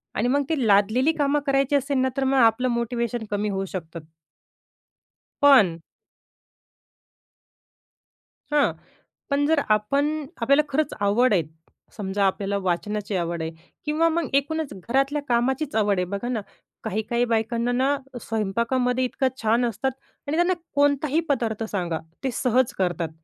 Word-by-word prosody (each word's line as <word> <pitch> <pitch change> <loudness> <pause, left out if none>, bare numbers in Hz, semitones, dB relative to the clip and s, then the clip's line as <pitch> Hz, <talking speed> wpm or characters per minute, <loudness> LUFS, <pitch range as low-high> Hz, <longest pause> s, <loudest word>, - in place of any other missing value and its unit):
आणि 235 - +1
मग 285 +3 +2
ते 320 - +2
लादलेली 215 +9 +4
कामं 290 0 +2
करायची 275 0 +2
असेल 280 0 0
ना, 260 0 +2
तर 270 - +1
मग 265 0 +2
आपलं 235 +1 +4
मोटिवेशन 235 -1 -2
कमी 205 +1 -1
होऊ 195 -1 -2
शकतं. 165 -3 -7 1.4
पण 205 -13 +6 2.7
हां, 295 -1 +3 0.6
पण 285 0 +2
जर 315 -1 +3
आपण 215 +8 +2 0.3
आपल्याला 280 +5 +4
खरंच 300 +2 0
आवड 210 +4 +3
आहे, 175 -4 +3 0.5
समजा 200 -1 -1
आपल्याला 200 +1 -1
वाचनाची 205 +3 -2
आवड 170 -1 -2
आहे 160 - -3 0.3
किंवा 310 +2 +2
मग 330 -3 -1
एकूणच 285 +1 0
घरातल्या 270 +9 0
कामाचीच 260 +4 0
आवड 205 -2 +2
आहे. 180 - 0
बघा 200 +6 -4
ना, 230 -4 -1 0.4
काही-काही 220 +4 -1
बायकांना 230 +1 0
ना 265 +3 +2 0.3
स्वयंपाकामध्ये 235 +4 0
इतकं 260 +1 0
छान 230 +3 +2
असतात 240 +3 -1 0.4
आणि 310 +3 -1
त्यांना 350 +1 +3 0.2
कोणताही 285 +2 +2
पदार्थ 230 -5 0
सांगा 175 -5 -2 0.2
ते 265 - 0
सहज 250 +1 +1
करतात. 175 -3 -1
240 Hz, 135 wpm, -24 LUFS, 205-275 Hz, 2.7 s, पण